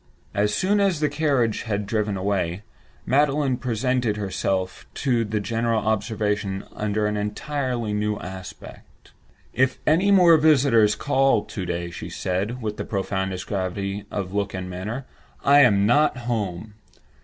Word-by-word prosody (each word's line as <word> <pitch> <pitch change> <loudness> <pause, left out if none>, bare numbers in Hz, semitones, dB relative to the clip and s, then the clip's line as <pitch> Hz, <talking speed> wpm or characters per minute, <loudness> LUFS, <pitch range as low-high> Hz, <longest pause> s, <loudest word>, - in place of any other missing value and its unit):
As 105 +1 +1
soon 200 - +1
as 195 -5 +2
the 150 -1 +1
carriage 140 -7 +1
had 105 -3 -2
driven 105 -1 -1
away, 95 -1 -1 0.4
Magdalen 140 -1 +2
presented 125 -2 0
herself 95 -2 -2
to 120 -5 +1
the 105 0 -2
general 115 +1 0
observation 105 -2 -1
under 105 0 -1
an 105 0 -1
entirely 120 +1 -2
new 105 0 -1
aspect. 95 -1 -11 0.4
"If 130 +1 +2
any 175 +6 +3
more 180 -4 +7
visitors 135 -8 +4
call 135 -6 +2
to 95 - -5
day," 85 0 -3
she - - -7
said, 105 +7 -3
with 105 -1 -3
the - - -3
profoundest 95 -2 -3
gravity 100 +1 -3
of 95 -2 -4
look 100 -1 -1
and 95 -1 -4
manner, 105 +9 -5 0.4
"I 140 +1 +7
am 100 -7 +5
not 145 +5 +3
at 125 - -8
home. 105 -4 -3
105 Hz, 145 wpm, -24 LUFS, 100-130 Hz, 0.4 s, more